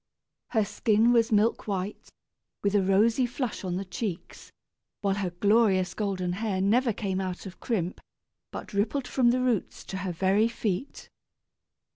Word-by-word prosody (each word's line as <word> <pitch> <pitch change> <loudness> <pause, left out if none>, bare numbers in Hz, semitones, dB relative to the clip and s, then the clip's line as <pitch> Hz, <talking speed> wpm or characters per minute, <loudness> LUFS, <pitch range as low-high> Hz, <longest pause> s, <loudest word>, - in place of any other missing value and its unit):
Her 220 -3 +1
skin 225 +3 +3
was 230 -1 +3
milk 215 +2 +2
white, 195 0 -4 0.5
with 200 0 +1
a 205 - +4
rosy 220 +6 +3
flush 245 -3 -4
on 180 -2 -2
the 195 +2 -3
cheeks, 180 0 -6 0.5
while 200 -1 +1
her 195 -2 -2
glorious 190 0 +2
golden 190 -4 -2
hair 200 -1 -2
never 230 +6 +3
came 195 -3 -2
out 185 0 -4
of 190 -1 -9
crimp, 185 -7 -2 0.5
but - - -8
rippled 240 +6 0
from 250 -3 +3
the 250 +1 +2
roots 245 -6 -1
to 190 - -6
her 185 0 -3
very 195 +5 +2
feet. 230 +1 -3
205 Hz, 155 wpm, -27 LUFS, 190-230 Hz, 0.5 s, a